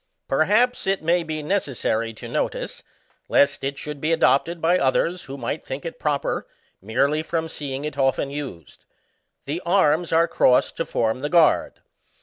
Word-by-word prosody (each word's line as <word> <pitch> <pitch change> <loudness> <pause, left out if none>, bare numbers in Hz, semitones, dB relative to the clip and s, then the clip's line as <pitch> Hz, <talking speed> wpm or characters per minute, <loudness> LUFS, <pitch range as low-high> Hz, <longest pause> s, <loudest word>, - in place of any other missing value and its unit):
Perhaps 210 - +2
it 195 -3 0
may 170 +2 +2
be 155 -2 -4
necessary 135 - -1
to 110 - -10
notice, - - -3 0.5
lest 140 -1 +3
it 140 +1 -2
should 150 -1 -7
be 155 - 0
adopted 165 +1 +2
by 175 +3 +3
others 170 +7 +1
who 135 +1 -7
might 135 +4 -4
think 135 +4 -6
it 165 - -6
proper 145 -2 -1 0.3
merely 140 +9 +1
from 160 0 -2
seeing 140 -2 -5
it 145 -2 -5
often 135 +1 +1
used. 135 - -8 0.6
The 155 +5 -3
arms 170 -2 +2
are 165 +1 +4
crossed 125 -6 +3
to 165 - -2
form 110 +2 0
the 145 +2 -3
guard. 170 -2 +3
150 Hz, 160 wpm, -23 LUFS, 135-165 Hz, 0.6 s, are